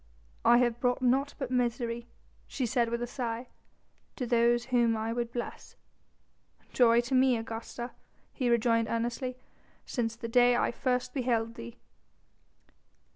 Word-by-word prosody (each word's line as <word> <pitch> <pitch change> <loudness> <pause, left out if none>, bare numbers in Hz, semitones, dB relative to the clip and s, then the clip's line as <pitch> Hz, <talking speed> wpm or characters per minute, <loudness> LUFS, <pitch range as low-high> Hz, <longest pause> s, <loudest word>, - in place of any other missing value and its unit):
"I 240 - +6
have 240 -1 +2
brought 245 +1 0
naught 270 +3 +2
but 265 -3 -4
misery," 235 -1 -1 0.4
she 260 - -2
said 235 0 +1
with 235 +1 -2
a - - 0
sigh, 240 -1 -4 0.7
"to 255 - -3
those 240 0 +2
whom 235 -3 +2
I 220 +1 -2
would 235 -1 -2
bless." 240 0 -6 1.0
"Joy 235 -1 +5
to 240 +3 -5
me, 255 -1 +4
Augusta," 225 +2 -6 0.4
he 250 -3 -1
rejoined 230 -1 +2
earnestly, 240 +2 -2 0.5
"since 230 -3 -2
the 230 0 -6
day 245 +1 +4
I - - +1
first 250 0 -1
beheld 235 -4 0
thee." 115 - -9
240 Hz, 140 wpm, -30 LUFS, 230-250 Hz, 1.0 s, I